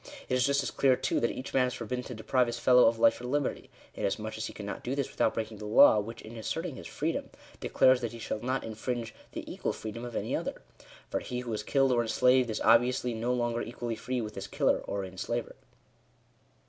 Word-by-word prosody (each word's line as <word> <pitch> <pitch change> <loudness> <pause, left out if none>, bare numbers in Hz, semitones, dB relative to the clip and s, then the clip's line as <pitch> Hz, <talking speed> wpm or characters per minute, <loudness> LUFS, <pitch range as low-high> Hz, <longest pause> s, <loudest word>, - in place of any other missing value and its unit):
It - - 0
is 125 +1 +3
just 140 0 +2
as 130 - -3
clear, 135 -2 +4
too, - - 0
that 120 - +1
each 130 - -6
man 130 -1 +4
is 125 - -4
forbidden 125 +2 -4
to 125 - -7
deprive 120 +3 +1
his 120 0 -3
fellow 125 +1 +6
of 115 0 +2
life 115 +1 +4
or - - -6
liberty: 140 +2 -1 0.2
inasmuch - - -2
as - - -3
he - - -7
cannot - - -6
do 130 +3 -2
this 140 -1 -2
without 110 - +1
breaking 110 -1 -4
the 105 - -6
law, 105 0 +7
which, 115 +3 -6
in 110 +2 -10
asserting 110 - -3
his - - -8
freedom, - - -2 0.3
declares 130 0 +4
that 120 -2 -2
he 115 - -8
shall 110 -1 -4
not 130 +3 -1
infringe 115 +1 -4
" - - -29
the - - -5
equal - - -2
freedom 110 +2 -6
of 120 -2 -6
any - - -1
other." - - -4 0.5
For - - 0
he 125 0 -4
who 120 -2 -4
is 105 - -2
killed 135 +4 +2
or 120 -1 +3
enslaved 125 +2 +3
is 110 - -2
obviously 120 +1 +4
no 115 +2 -1
longer 120 -1 0
equally 120 0 -4
free 125 +2 -3
with 105 -1 -5
his 95 0 -6
killer - - +2
or 100 -1 -4
enslaver. 95 +6 -4
120 Hz, 235 wpm, -30 LUFS, 110-125 Hz, 0.5 s, law